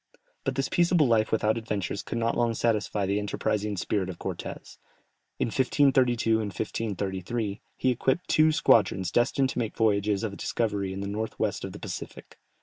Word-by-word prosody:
But -, -, -1 dB
this -, -, 0 dB
peaceable 175 Hz, -3 st, +3 dB
life 110 Hz, -3 st, +2 dB
without 110 Hz, +1 st, +2 dB
adventures 100 Hz, -3 st, -3 dB
could -, -, -5 dB
not 115 Hz, 0 st, 0 dB
long 120 Hz, -1 st, +1 dB
satisfy 105 Hz, -3 st, 0 dB
the 100 Hz, +2 st, 0 dB
enterprising 105 Hz, 0 st, -1 dB
spirit 95 Hz, 0 st, -1 dB
of 90 Hz, -, -6 dB
Cortès. -, -, -7 dB, 0.6 s
In -, -, 0 dB
1532 125 Hz, -3 st, +3 dB
and 110 Hz, -, -2 dB
1533, 100 Hz, +1 st, -3 dB, 0.2 s
he 130 Hz, -, +2 dB
equipped 130 Hz, +8 st, 0 dB
two 155 Hz, 0 st, +4 dB
squadrons 95 Hz, -, +3 dB
destined 130 Hz, +4 st, +2 dB
to -, -, -3 dB
make 115 Hz, -3 st, -3 dB
voyages 105 Hz, -2 st, +2 dB
of 105 Hz, -3 st, -3 dB
discovery 100 Hz, -4 st, -1 dB
in 95 Hz, +1 st, -5 dB
the 100 Hz, -, -3 dB
north 110 Hz, +2 st, -4 dB
west 105 Hz, -2 st, -1 dB
of 95 Hz, -, -5 dB
the 100 Hz, -, -9 dB
Pacific. 95 Hz, -5 st, -8 dB
110 Hz, 170 wpm, -27 LUFS, 100-120 Hz, 0.6 s, two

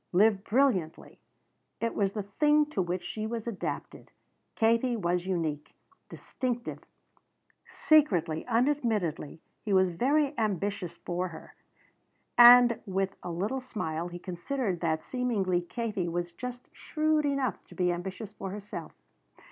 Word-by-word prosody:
Live 200 Hz, +1 st, +4 dB
brilliantly. 210 Hz, -, 0 dB, 0.6 s
It 230 Hz, 0 st, -1 dB
was 200 Hz, -1 st, 0 dB
the 210 Hz, -, -3 dB
thing 295 Hz, +9 st, +3 dB
to 195 Hz, -, 0 dB
which 175 Hz, 0 st, -2 dB
she 215 Hz, +4 st, -4 dB
was 230 Hz, -1 st, -4 dB
adapted. 230 Hz, -5 st, -5 dB, 0.5 s
Katie 230 Hz, +2 st, +2 dB
was 175 Hz, -2 st, -1 dB
unique. 160 Hz, -5 st, -3 dB, 0.3 s
Distinctive. 245 Hz, -2 st, -4 dB, 0.9 s
Secretly, 180 Hz, -, +2 dB
unadmittedly, 225 Hz, -, 0 dB, 0.2 s
he 205 Hz, -, -1 dB
was 185 Hz, -1 st, +4 dB
very 280 Hz, -, +1 dB
ambitious 200 Hz, -4 st, -2 dB
for 180 Hz, +1 st, -3 dB
her. 165 Hz, -3 st, -11 dB, 0.8 s
And 240 Hz, -1 st, +9 dB
with 195 Hz, 0 st, -1 dB
a -, -, -6 dB
little 205 Hz, +10 st, -2 dB
smile 170 Hz, -9 st, -4 dB
he 175 Hz, 0 st, -7 dB
considered 185 Hz, +3 st, -3 dB
that 160 Hz, -2 st, -1 dB
seemingly 210 Hz, -8 st, 0 dB
Katie 200 Hz, -1 st, -3 dB
was 175 Hz, +1 st, -3 dB
just 250 Hz, +6 st, -7 dB
shrewd 310 Hz, -1 st, 0 dB
enough 275 Hz, -7 st, -1 dB
to -, -, -14 dB
be 180 Hz, -1 st, +1 dB
ambitious 190 Hz, +4 st, -5 dB
for 195 Hz, -2 st, -6 dB
herself. 205 Hz, +1 st, -7 dB
200 Hz, 130 wpm, -29 LUFS, 175-245 Hz, 0.9 s, And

